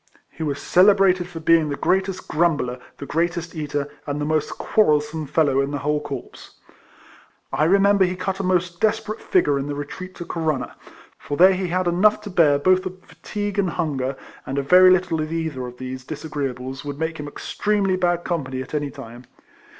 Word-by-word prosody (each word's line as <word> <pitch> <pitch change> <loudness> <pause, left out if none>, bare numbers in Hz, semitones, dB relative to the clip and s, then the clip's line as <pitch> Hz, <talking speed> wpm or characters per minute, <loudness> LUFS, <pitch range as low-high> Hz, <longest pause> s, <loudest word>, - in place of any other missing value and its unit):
He - - -12
was 145 -3 -2
celebrated 185 -1 +4
for 175 -2 -8
being 160 -1 +3
the 145 - -2
greatest 190 +3 -1
grumbler, 150 -6 0 0.2
the 140 - -7
greatest 170 +2 -2
eater, 145 -2 -3 0.2
and 145 0 -2
the 145 - -1
most 155 0 0
quarrelsome 150 -5 +1
fellow 140 -3 +2
in 140 - -1
the 145 - -3
whole 150 +1 -1
corps. 140 -4 -8 1.0
I 155 - +2
remember 200 +2 +4
he 180 0 -2
cut 190 +1 -3
a - - -2
most 180 -1 0
desperate 220 0 0
figure 145 -6 +2
in 135 - -4
the 145 - -3
retreat 150 +6 -7
to 175 - -7
Corunna; 160 -5 -2 0.4
for 145 - -5
there 185 +2 +7
he 185 0 -2
had 180 +1 0
enough 185 +5 +3
to 205 -1 -8
bear 155 -5 +4
both 185 +5 +3
of 185 0 -10
fatigue 205 -1 -5
and 190 -3 +2
hunger; 135 -5 -2 0.3
and 135 - -5
a 140 - 0
very 180 +5 +7
little 180 -3 +2
of 155 +1 -4
either 160 -6 -3
of 125 0 -11
these 130 0 -6
disagreeables 135 -3 -5
would 145 -1 -6
make 160 +1 -3
him 150 - -5
extremely 200 +5 -1
bad 175 -1 0
company 135 -7 -3
at 130 - -15
any 145 -1 -1
time. 120 -1 -11
160 Hz, 190 wpm, -22 LUFS, 145-185 Hz, 1.0 s, there